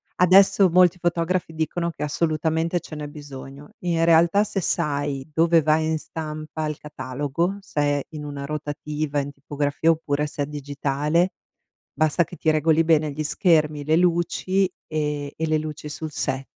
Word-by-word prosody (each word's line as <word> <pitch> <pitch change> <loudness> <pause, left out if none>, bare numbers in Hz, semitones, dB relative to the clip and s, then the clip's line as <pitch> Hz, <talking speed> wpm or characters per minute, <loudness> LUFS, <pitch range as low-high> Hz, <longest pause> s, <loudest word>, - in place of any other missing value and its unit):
Adesso 190 +1 +5
molti 180 0 +5
fotografi 175 0 -1
dicono 170 +2 -2
che 155 - -13
assolutamente 160 +2 0
ce 160 -1 -10
n'è 150 -1 -5
bisogno. 145 -1 -10
In 170 -2 +1
realtà 170 +4 +5
se 210 -2 -3
sai 145 -5 -1
dove 165 +2 +4
va 155 +1 +3
in 160 0 0
stampa 155 0 -5
il 150 -1 -4
catalogo, 145 +6 -3
se 190 - -5
è 145 -1 +1
in 150 - -6
una 140 -1 -5
rotativa, 150 0 -3
in 140 0 -3
tipografia 145 +3 0
oppure 150 -2 -1
se 150 0 -5
è - - -2
digitale, 145 +3 0 0.6
basta 155 +3 +2
che 175 - -11
ti 160 - +1
regoli 155 +1 +3
bene 155 -2 +2
gli 155 +2 -4
schermi, 150 -3 +2
le 155 - +3
luci 180 +2 +1 0.2
e 150 -2 -2
e 160 - -1
le 155 0 +2
luci 150 -1 -6
sul 155 +1 -5
set. 135 -1 -2
155 Hz, 165 wpm, -23 LUFS, 145-170 Hz, 0.6 s, Adesso